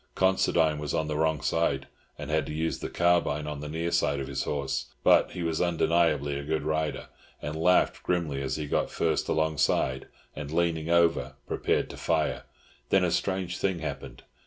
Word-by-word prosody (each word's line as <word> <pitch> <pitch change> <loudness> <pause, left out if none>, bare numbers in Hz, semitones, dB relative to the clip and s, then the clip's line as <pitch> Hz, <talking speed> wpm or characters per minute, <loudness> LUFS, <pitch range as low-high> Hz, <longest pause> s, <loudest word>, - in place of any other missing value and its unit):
Considine 85 -5 +2
was 75 -1 -3
on 80 - 0
the 75 - -2
wrong 80 -1 +1
side, 70 -5 0 0.3
and 75 - -6
had 80 -3 +1
to - - -5
use 80 +1 -1
the - - -4
carbine 85 -4 +2
on 75 -1 -5
the 75 0 -6
near 85 +2 -2
side 70 -4 +1
of 70 - -3
his 70 0 -3
horse; 70 -2 -2 0.2
but - - +5
he 90 - -4
was 80 -1 -1
undeniably 80 -4 +2
a - - -6
good 75 0 -1
rider, 75 -3 -2 0.3
and 75 +1 -5
laughed 90 +3 +3
grimly 80 -6 -1
as 65 -1 -2
he 75 - -3
got 70 - 0
first - - 0
alongside, 75 -4 +1 0.3
and, 75 -2 -6
leaning 80 0 0
over, 85 -6 +2
prepared - - 0
to - - -10
fire. - - 0 0.4
Then - - +4
a - - +1
strange 95 -2 -1
thing 95 -2 0
happened. 80 -2 -6
80 Hz, 185 wpm, -28 LUFS, 70-85 Hz, 0.4 s, but